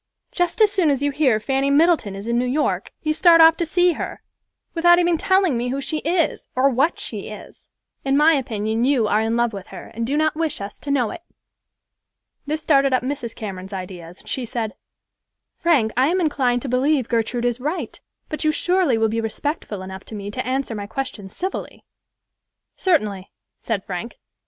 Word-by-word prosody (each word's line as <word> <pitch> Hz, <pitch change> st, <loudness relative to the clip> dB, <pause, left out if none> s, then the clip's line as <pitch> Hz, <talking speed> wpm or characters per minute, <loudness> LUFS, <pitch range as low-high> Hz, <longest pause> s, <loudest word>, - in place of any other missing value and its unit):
Just 355 Hz, +4 st, -1 dB
as 425 Hz, -1 st, +6 dB
soon 375 Hz, -6 st, +2 dB
as 280 Hz, -1 st, +1 dB
you 285 Hz, -, +1 dB
hear 265 Hz, -6 st, +2 dB
Fanny 270 Hz, +4 st, 0 dB
Middleton 295 Hz, -, +3 dB
is 200 Hz, +1 st, -7 dB
in 235 Hz, +1 st, -1 dB
New 245 Hz, +1 st, +1 dB
York, 290 Hz, +4 st, -1 dB
you 310 Hz, -1 st, +1 dB
start 335 Hz, +1 st, +6 dB
off 325 Hz, 0 st, +8 dB
to 340 Hz, -, -1 dB
see 355 Hz, +2 st, +3 dB
her, -, -, -6 dB, 0.5 s
without 345 Hz, +1 st, +5 dB
even 350 Hz, -1 st, +3 dB
telling 375 Hz, -3 st, +2 dB
me 240 Hz, +1 st, -1 dB
who 270 Hz, +2 st, -2 dB
she 305 Hz, +3 st, -3 dB
is, 330 Hz, +1 st, -1 dB
or 270 Hz, +2 st, +4 dB
what 275 Hz, +7 st, +1 dB
she -, -, -5 dB
is. -, -, -11 dB, 0.4 s
In 270 Hz, 0 st, +2 dB
my 310 Hz, +2 st, +6 dB
opinion 225 Hz, -4 st, -1 dB
you 255 Hz, -4 st, +3 dB
are 210 Hz, -, +2 dB
in 225 Hz, +1 st, 0 dB
love 235 Hz, -1 st, +1 dB
with 195 Hz, -2 st, -7 dB
her, -, -, -10 dB
and 230 Hz, +1 st, -3 dB
do 285 Hz, +3 st, 0 dB
not 310 Hz, 0 st, +2 dB
wish 320 Hz, -2 st, -2 dB
us 200 Hz, 0 st, -7 dB
to 290 Hz, -, -8 dB
know 250 Hz, -6 st, +1 dB
it." -, -, -8 dB, 1.3 s
This 310 Hz, +1 st, -2 dB
started 275 Hz, -3 st, +3 dB
up 255 Hz, -, +2 dB
Mrs. 255 Hz, -3 st, -4 dB
Cameron's 190 Hz, -2 st, -7 dB
ideas, 180 Hz, -2 st, -8 dB
and -, -, -22 dB
she 260 Hz, -, -2 dB
said, 225 Hz, -2 st, -3 dB, 0.8 s
"Frank, 285 Hz, -11 st, +2 dB
I 255 Hz, +3 st, +3 dB
am 360 Hz, +4 st, +1 dB
inclined 260 Hz, -7 st, +1 dB
to -, -, -4 dB
believe 260 Hz, +1 st, +1 dB
Gertrude 235 Hz, +1 st, -1 dB
is 240 Hz, 0 st, 0 dB
right; 305 Hz, +8 st, -4 dB, 0.3 s
but 310 Hz, -, -4 dB
you 310 Hz, -, +3 dB
surely 355 Hz, -6 st, +2 dB
will 225 Hz, 0 st, +2 dB
be 225 Hz, +1 st, -1 dB
respectful 225 Hz, -, -4 dB
enough 190 Hz, 0 st, -8 dB
to 220 Hz, -, -9 dB
me 200 Hz, 0 st, -6 dB
to -, -, -3 dB
answer 265 Hz, -2 st, -1 dB
my 205 Hz, -2 st, -5 dB
questions 215 Hz, -6 st, -6 dB
civilly." 375 Hz, +2 st, -5 dB, 0.9 s
"Certainly," 210 Hz, -, 0 dB, 0.3 s
said 210 Hz, -4 st, -2 dB
Frank. 190 Hz, +5 st, -5 dB
265 Hz, 200 wpm, -22 LUFS, 220-310 Hz, 1.3 s, off